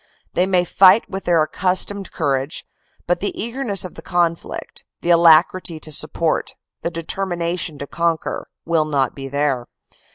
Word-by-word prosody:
They 180 Hz, -, +2 dB
may 180 Hz, -2 st, +2 dB
fight 190 Hz, +5 st, +5 dB
with 195 Hz, 0 st, -6 dB
their 165 Hz, -3 st, +3 dB
accus 185 Hz, +3 st, +2 dB
tomed 200 Hz, -1 st, -7 dB
courage; 140 Hz, -1 st, -2 dB, 0.4 s
but 175 Hz, 0 st, 0 dB
the 200 Hz, -, -4 dB
eagerness 230 Hz, -4 st, -1 dB
of 180 Hz, -, -8 dB
the -, -, -10 dB
conflict, 170 Hz, -2 st, -2 dB, 0.2 s
the 175 Hz, -, +1 dB
alacrity 170 Hz, 0 st, +4 dB
to 155 Hz, -, -9 dB
support, 155 Hz, +2 st, 0 dB, 0.3 s
the -, -, -2 dB
determination 170 Hz, -1 st, -2 dB
to 140 Hz, -, -6 dB
conquer, 170 Hz, +2 st, -2 dB, 0.2 s
will 165 Hz, -2 st, +2 dB
not 140 Hz, -4 st, 0 dB
be 135 Hz, -1 st, -7 dB
there. 140 Hz, -3 st, -1 dB
170 Hz, 155 wpm, -20 LUFS, 155-185 Hz, 0.4 s, fight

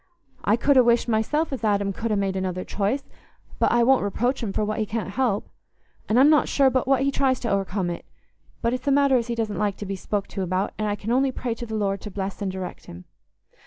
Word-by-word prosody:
I 210 Hz, -, +3 dB
could 275 Hz, +4 st, +3 dB
ha' 255 Hz, -, +8 dB
wished 235 Hz, 0 st, +3 dB
myself 270 Hz, +8 st, 0 dB
as 260 Hz, -, -5 dB
Adam 200 Hz, -2 st, +1 dB
could 230 Hz, +4 st, -3 dB
ha' 215 Hz, -, +1 dB
made 195 Hz, -1 st, -1 dB
another 185 Hz, -1 st, -2 dB
choice, 215 Hz, +8 st, -1 dB, 0.6 s
but -, -, +3 dB
I 235 Hz, 0 st, +4 dB
wouldn't 265 Hz, +2 st, +4 dB
reproach 245 Hz, +6 st, -1 dB
him 220 Hz, -4 st, -2 dB
for 210 Hz, -, -1 dB
what 215 Hz, +1 st, -2 dB
he 215 Hz, -, +1 dB
can't 215 Hz, -3 st, -3 dB
help. 225 Hz, -2 st, 0 dB, 0.6 s
And 225 Hz, +3 st, +4 dB
I'm 275 Hz, -, +7 dB
not 305 Hz, -, +4 dB
sure 270 Hz, -2 st, +4 dB
but 255 Hz, 0 st, 0 dB
what 270 Hz, -1 st, +3 dB
he 275 Hz, -, +2 dB
tries 265 Hz, -2 st, +1 dB
to 235 Hz, -, -1 dB
o'ercome 195 Hz, -2 st, -1 dB
it. 170 Hz, -, -7 dB, 0.6 s
But 235 Hz, +1 st, +1 dB
it's 255 Hz, +3 st, -4 dB
a -, -, +4 dB
matter 280 Hz, -1 st, +4 dB
as 240 Hz, -2 st, +1 dB
he 235 Hz, -, -2 dB
doesn't 215 Hz, -4 st, -2 dB
like 205 Hz, -2 st, 0 dB
to 205 Hz, -, -6 dB
be 195 Hz, 0 st, -3 dB
spoke 200 Hz, +1 st, -3 dB
to 195 Hz, -, -4 dB
about, 185 Hz, +1 st, -1 dB
and 215 Hz, -, 0 dB
I 205 Hz, -, 0 dB
can 210 Hz, +2 st, -5 dB
only 265 Hz, +2 st, +2 dB
pray 245 Hz, -2 st, -3 dB
to 235 Hz, +1 st, -7 dB
the 220 Hz, -, -4 dB
Lord 200 Hz, -2 st, -1 dB
to 210 Hz, -, -7 dB
bless 195 Hz, 0 st, -5 dB
and 195 Hz, -2 st, -1 dB
direct 185 Hz, -1 st, -7 dB
him." 85 Hz, +1 st, -10 dB
220 Hz, 260 wpm, -24 LUFS, 195-255 Hz, 0.6 s, ha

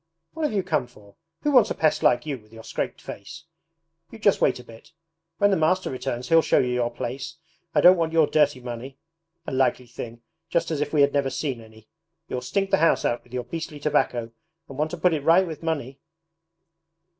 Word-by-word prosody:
'What 320 Hz, -1 st, -2 dB
have 295 Hz, -, -1 dB
you 195 Hz, -2 st, +1 dB
come 155 Hz, -8 st, 0 dB
for? 105 Hz, -5 st, -19 dB, 0.3 s
Who 295 Hz, -, +2 dB
wants 250 Hz, -6 st, +5 dB
a -, -, -2 dB
pest 155 Hz, -1 st, +2 dB
like 120 Hz, -, +3 dB
you, 140 Hz, -4 st, -3 dB
with 110 Hz, 0 st, -24 dB
your 115 Hz, 0 st, -12 dB
scraped -, -, -4 dB
face? 160 Hz, +12 st, -9 dB, 0.7 s
You 225 Hz, -, -11 dB
just 205 Hz, -2 st, +2 dB
wait -, -, +3 dB
a -, -, -10 dB
bit; 115 Hz, +8 st, -16 dB, 0.4 s
when 205 Hz, 0 st, +3 dB
the -, -, +4 dB
master 185 Hz, +4 st, +1 dB
returns 125 Hz, -1 st, -4 dB
he'll 165 Hz, 0 st, +6 dB
show -, -, +2 dB
you 125 Hz, -1 st, +2 dB
your 120 Hz, -1 st, 0 dB
place. 130 Hz, +5 st, -5 dB, 0.4 s
I -, -, +5 dB
don't 180 Hz, +1 st, +8 dB
want 165 Hz, -1 st, 0 dB
your 160 Hz, -1 st, +4 dB
dirty 145 Hz, -3 st, +2 dB
money! 125 Hz, +2 st, -7 dB, 0.5 s
A -, -, -5 dB
likely 130 Hz, -1 st, +1 dB
thing 120 Hz, 0 st, -9 dB, 0.3 s
just 165 Hz, -1 st, 0 dB
as 150 Hz, -2 st, -1 dB
if 145 Hz, 0 st, -2 dB
we 150 Hz, -, +3 dB
had 140 Hz, 0 st, +4 dB
never 140 Hz, -2 st, +1 dB
seen 130 Hz, -2 st, -3 dB
any! 110 Hz, 0 st, -17 dB, 0.4 s
You'll 125 Hz, -, -3 dB
stink 195 Hz, +10 st, -1 dB
the -, -, +5 dB
house 165 Hz, +1 st, +3 dB
out 120 Hz, -, 0 dB
with 120 Hz, -, -24 dB
your 125 Hz, -1 st, -3 dB
beastly 160 Hz, -1 st, -6 dB
tobacco 125 Hz, -6 st, 0 dB, 0.4 s
and 135 Hz, -, -10 dB
want 155 Hz, +1 st, +1 dB
to 175 Hz, -, -6 dB
put 175 Hz, +1 st, +3 dB
it 155 Hz, -, -1 dB
right 170 Hz, +6 st, +5 dB
with 160 Hz, -3 st, -7 dB
money! 145 Hz, -5 st, -3 dB
145 Hz, 220 wpm, -25 LUFS, 125-165 Hz, 0.7 s, don't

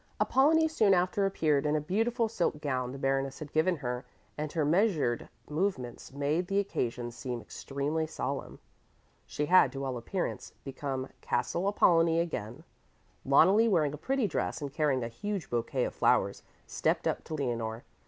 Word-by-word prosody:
Apollonie 320 Hz, +5 st, +4 dB
soon 215 Hz, -11 st, +3 dB
after 185 Hz, +2 st, +1 dB
appeared 155 Hz, -7 st, +1 dB
in 150 Hz, 0 st, +1 dB
a -, -, +2 dB
beautiful 225 Hz, -, 0 dB
silk 175 Hz, -8 st, -1 dB
gown 130 Hz, -4 st, -2 dB
the 135 Hz, -, -7 dB
Baroness 135 Hz, 0 st, 0 dB
had 155 Hz, -2 st, -8 dB
given 170 Hz, +4 st, +3 dB
her, 125 Hz, -4 st, -4 dB, 0.3 s
and 150 Hz, 0 st, -4 dB
her 155 Hz, -3 st, +1 dB
measured 160 Hz, -, +1 dB, 0.2 s
movements 150 Hz, -8 st, -2 dB
made 145 Hz, +6 st, -1 dB
the 195 Hz, -, 0 dB
occasion 120 Hz, -11 st, -1 dB
seem 125 Hz, 0 st, -5 dB
extremely 145 Hz, +6 st, -3 dB
solemn. 140 Hz, -3 st, -4 dB, 0.7 s
She 150 Hz, -, -2 dB
had, 175 Hz, -5 st, +6 dB
to 135 Hz, 0 st, -4 dB
all 130 Hz, -2 st, -2 dB
appearance, 175 Hz, +10 st, -4 dB
become 135 Hz, -1 st, -4 dB
"Castle 180 Hz, +3 st, -1 dB
Apollonie" 165 Hz, -4 st, +4 dB
again. 145 Hz, -5 st, -4 dB, 0.6 s
Loneli, 195 Hz, +11 st, +5 dB
wearing 155 Hz, -7 st, +2 dB
a -, -, -5 dB
pretty 260 Hz, -, 0 dB
dress 180 Hz, -, -2 dB
and 140 Hz, -3 st, -5 dB
carrying 140 Hz, -5 st, +1 dB
a -, -, -2 dB
huge 195 Hz, -, -5 dB
bouquet 120 Hz, +2 st, 0 dB
of -, -, -2 dB
flowers, -, -, +2 dB, 0.2 s
stepped -, -, 0 dB
up -, -, -1 dB
to 160 Hz, -, -4 dB
Leonore. 115 Hz, -5 st, -3 dB
150 Hz, 165 wpm, -30 LUFS, 135-185 Hz, 0.7 s, had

